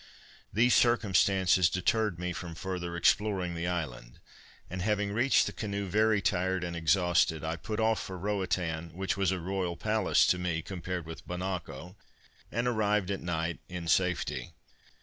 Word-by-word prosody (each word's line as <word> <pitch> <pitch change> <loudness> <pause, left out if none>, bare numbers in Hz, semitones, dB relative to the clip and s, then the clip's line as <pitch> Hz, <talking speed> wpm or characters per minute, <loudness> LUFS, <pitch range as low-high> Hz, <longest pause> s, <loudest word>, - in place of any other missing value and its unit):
These 120 +3 +4
circumstances 95 -6 +4
deterred 105 +1 0
me 90 0 -3
from 85 -2 -6
further 90 0 -4
exploring 95 -1 +2
the 85 +1 -3
island; 75 -9 -4 0.5
and 95 +1 -5
having 105 0 0
reached 120 +5 +3
the - - -3
canoe 100 -2 -3
very 110 +2 +2
tired 95 0 0
and 85 -1 -4
exhausted, 85 -1 +2
I 80 +1 -2
put 105 +6 -5
off 110 0 +2
for 95 - -6
Roatan, 90 -4 -2
which 95 +1 -1
was 95 -2 +1
a 95 - 0
royal 90 -1 -2
palace 110 -2 +2
to 90 - -6
me, 85 -2 -2
compared 90 -2 -5
with 80 0 -9
Bonacco, 90 -1 -5 0.5
and 115 +2 -1
arrived 105 -4 +1
at 100 - -3
night 85 -1 -2
in 90 -2 -5
safety. 85 -7 0
90 Hz, 155 wpm, -30 LUFS, 85-100 Hz, 0.5 s, These